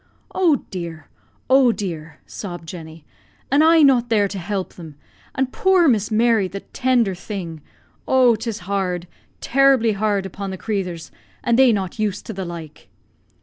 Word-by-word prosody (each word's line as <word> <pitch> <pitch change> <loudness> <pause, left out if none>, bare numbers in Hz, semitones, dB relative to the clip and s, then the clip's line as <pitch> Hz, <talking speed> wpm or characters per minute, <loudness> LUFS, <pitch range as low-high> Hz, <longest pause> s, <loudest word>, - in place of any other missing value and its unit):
"Oh, 335 -8 +2
dear! 165 -5 -7 0.4
oh, 260 -1 +5
dear!" 165 -7 -6
sobbed 175 -4 -8
Jenny; 160 -2 -10 0.5
"an' 285 +2 +4
I 320 0 +6
not 250 -4 +4
there 210 -3 +3
to 195 - -5
hilp 190 +1 -4
them! 160 -4 -11 0.4
An' 265 -1 +1
poor 365 +6 +3
Miss 220 -6 +2
Mary, 225 -2 +2
the 195 +2 -7
tinder 245 -6 +2
thing! 175 -4 -7 0.5
Oh, 255 -3 +5
'tis 220 -1 -5
hard, 180 -2 -2 0.4
terribly 265 -3 +3
hard 205 -1 0
upon 195 +1 -6
the 190 - -5
crathurs, 180 -6 -4 0.3
an' 235 - +2
they 260 0 +6
not 195 -1 -3
used 205 -2 -2
to 225 - -6
the 190 -1 -5
like." 165 -3 -9
205 Hz, 155 wpm, -21 LUFS, 180-245 Hz, 0.5 s, I